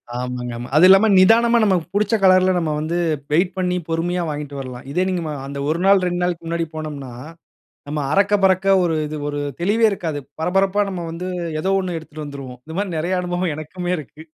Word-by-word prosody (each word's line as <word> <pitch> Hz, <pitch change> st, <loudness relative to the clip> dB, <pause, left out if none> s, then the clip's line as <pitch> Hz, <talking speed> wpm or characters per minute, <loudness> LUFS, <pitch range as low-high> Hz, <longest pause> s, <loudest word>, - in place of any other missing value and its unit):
ஆமாங்க 125 Hz, -1 st, -4 dB
ஆமா. 120 Hz, +1 st, -6 dB
அதுவும் 175 Hz, +4 st, +7 dB
இல்லாம 195 Hz, +3 st, +7 dB
நிதானமா 230 Hz, +5 st, +5 dB
நமக்கு 185 Hz, -5 st, +2 dB
புடிச்ச 210 Hz, +2 st, +2 dB
கலர்‌ல 185 Hz, 0 st, +5 dB
நம்ம 160 Hz, -3 st, -1 dB
வந்து 160 Hz, +3 st, -2 dB, 0.3 s
வெயிட் 175 Hz, +3 st, +2 dB
பண்ணி 180 Hz, -1 st, 0 dB
பொறுமையா 175 Hz, +2 st, -1 dB
வாங்கிட்டு 145 Hz, -1 st, -5 dB
வரலாம். 130 Hz, -1 st, -8 dB
இதே 180 Hz, +5 st, +1 dB
நீங்க 180 Hz, -2 st, -1 dB, 0.3 s
அந்த 140 Hz, 0 st, -6 dB
1 160 Hz, +2 st, 0 dB
நாள் 195 Hz, -1 st, +5 dB
2 175 Hz, 0 st, -1 dB
நாளுக்கு 175 Hz, -2 st, -2 dB
முன்னாடி 165 Hz, 0 st, -1 dB
போனோம்னா, 150 Hz, -4 st, -6 dB, 0.8 s
நம்ம 150 Hz, 0 st, -2 dB
அறக்க 200 Hz, +1 st, +3 dB
பறக்க 190 Hz, 0 st, +3 dB, 0.2 s
ஒரு 165 Hz, -, +1 dB
இது 155 Hz, -, -5 dB
ஒரு 145 Hz, 0 st, -3 dB, 0.2 s
தெளிவே 210 Hz, +6 st, +2 dB
இருக்காது. 160 Hz, -7 st, -3 dB, 0.2 s
பரபரப்பா 195 Hz, +4 st, +1 dB
நம்ம 175 Hz, -3 st, -5 dB
வந்து 175 Hz, +3 st, -6 dB, 0.3 s
ஏதோ 190 Hz, +4 st, 0 dB
ஒண்ணு 180 Hz, -3 st, -3 dB
எடுத்துட்டு 155 Hz, -1 st, -9 dB
வந்துடுவோம். 135 Hz, -3 st, -9 dB
இந்த 160 Hz, +1 st, -9 dB
மாதிரி 195 Hz, -5 st, -2 dB
நிறைய 175 Hz, +4 st, -1 dB
அனுபவம் 175 Hz, -2 st, -2 dB
எனக்குமே 175 Hz, +3 st, -4 dB
இருக்கு. 155 Hz, +1 st, -11 dB
175 Hz, 190 wpm, -20 LUFS, 150-185 Hz, 0.8 s, அதுவும்